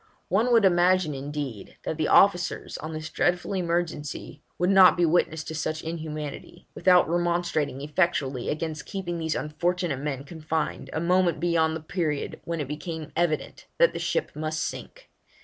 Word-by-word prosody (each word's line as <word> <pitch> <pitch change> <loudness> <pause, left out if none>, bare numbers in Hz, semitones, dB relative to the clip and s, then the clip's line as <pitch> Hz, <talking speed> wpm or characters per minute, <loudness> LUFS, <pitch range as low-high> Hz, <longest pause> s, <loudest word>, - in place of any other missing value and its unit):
One 220 +7 +2
would 230 -4 +5
imagine, 180 -3 +3
indeed, 140 -5 -6
that - - -2
the 155 - 0
officers 180 -4 +3
on 155 +1 -6
this 155 0 -6
dreadful 180 +2 0
emergency 170 -5 -2 0.2
would 180 +2 +2
not 190 -2 +7
be 175 - +4
witness 160 -1 +1
to 160 - -6
such 155 0 -3
inhumanity, 155 +1 -6
without 180 -1 +4
remonstrating 170 -5 0
effectually 145 -4 0
against 155 0 -3
keeping 175 -3 -4
these 160 -1 -1
unfortunate 170 0 -1
men 140 -2 -3
confined 160 +1 -3
a - - -2
moment 175 0 +2
beyond 165 -2 +2
the 160 - -5
period 155 -3 -3
when 170 -1 -3
it 145 - -3
became 155 +1 -6
evident 170 -3 -1
that - - +5
the - - -4
ship 485 - -1
must 155 +1 -2
sink. - - -6
160 Hz, 160 wpm, -26 LUFS, 150-175 Hz, 0.2 s, not